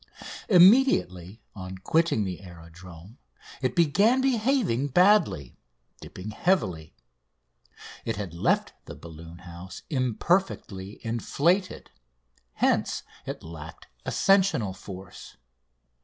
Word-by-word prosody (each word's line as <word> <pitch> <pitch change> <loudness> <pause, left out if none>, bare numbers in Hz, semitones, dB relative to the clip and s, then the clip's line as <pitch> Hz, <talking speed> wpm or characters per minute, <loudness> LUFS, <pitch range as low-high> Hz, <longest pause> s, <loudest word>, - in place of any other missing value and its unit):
Immediately 175 - +4
on 95 -1 -7
quitting 160 - +1
the 90 -2 -5
aerodrome 85 +3 -13 0.4
it 130 -2 -1
began 200 - +3
behaving 240 - +1
badly, 175 - +2 0.4
dipping 95 +4 -8
heavily. 95 - -1 1.1
It 115 - -2
had 100 -5 -6
left 85 - 0
the - - -9
balloon 85 +1 -11
house 85 +2 -10
imperfectly 125 - -1
inflated, 165 - 0 0.6
hence - - 0 0.2
it - - -6
lacked 80 -1 -11
ascensional 185 - +2
force. 95 0 -11
110 Hz, 90 wpm, -26 LUFS, -, 1.1 s, Immediately